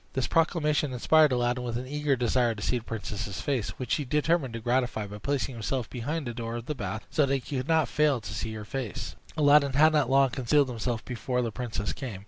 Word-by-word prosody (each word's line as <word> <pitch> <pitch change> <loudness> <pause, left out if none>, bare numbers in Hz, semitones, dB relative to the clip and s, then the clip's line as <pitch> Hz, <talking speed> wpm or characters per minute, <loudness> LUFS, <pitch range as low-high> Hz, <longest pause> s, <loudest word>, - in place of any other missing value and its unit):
This 130 - 0
proclamation 150 -4 +1
inspired 155 +4 +4
Aladdin 125 0 0
with 120 -1 -2
an 125 - -5
eager 145 +1 0
desire 120 -1 +1
to 100 - -8
see 125 - +1
the - - -15
princess's 105 -3 -5
face, 130 -7 -1
which 130 - -2
he 150 - +1
determined 150 -1 +1
to - - -3
gratify 120 -2 0
by 105 +1 -8
placing 140 +1 -1
himself 120 +1 -2
behind 145 +6 -3
the 120 - -4
door 115 0 -4
of 120 -1 -5
the 150 - -2
bath, 110 -4 -5
so 145 -3 +3
that 135 - +2
he 135 +1 -4
could 130 +2 -3
not 160 -1 +3
fail 150 -4 +2
to 105 - -7
see 110 +1 -3
her 105 -1 -7
face. 125 -1 -5 0.2
Aladdin 145 -2 +5
had 155 +3 +5
not 150 -2 +2
long 135 -1 +4
concealed 135 +2 +2
himself 120 -1 -3
before 125 0 -2
the 115 - -2
princess 105 -4 -3
came. 120 -8 -6
125 Hz, 230 wpm, -28 LUFS, 115-145 Hz, 0.2 s, Aladdin